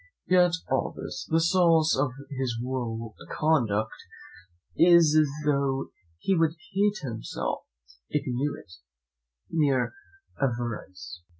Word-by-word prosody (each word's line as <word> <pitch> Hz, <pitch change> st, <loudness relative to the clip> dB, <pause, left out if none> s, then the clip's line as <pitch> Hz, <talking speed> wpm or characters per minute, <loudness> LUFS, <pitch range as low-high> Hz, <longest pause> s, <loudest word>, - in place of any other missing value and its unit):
Yet, 180 Hz, 0 st, +5 dB, 0.2 s
after -, -, -3 dB
all -, -, -1 dB
this, -, -, -6 dB
the 165 Hz, -, +3 dB
source 165 Hz, -2 st, +4 dB
of 135 Hz, +1 st, +1 dB, 0.2 s
his 130 Hz, -4 st, -2 dB
whole 115 Hz, -3 st, -4 dB, 0.2 s
conduct 110 Hz, -9 st, +1 dB, 0.8 s
is, 170 Hz, -2 st, +6 dB, 0.3 s
though 140 Hz, -2 st, +1 dB, 0.3 s
he 195 Hz, -, +1 dB
would 165 Hz, -1 st, +2 dB, 0.2 s
hate 205 Hz, +1 st, +1 dB
himself 115 Hz, -2 st, -4 dB, 0.4 s
if 150 Hz, -, 0 dB
he 130 Hz, -, -2 dB
knew 140 Hz, +4 st, -1 dB
it, 90 Hz, -, -15 dB, 0.8 s
mere 140 Hz, -6 st, +1 dB, 0.5 s
avarice. 120 Hz, -8 st, -3 dB
140 Hz, 115 wpm, -27 LUFS, 120-165 Hz, 0.8 s, is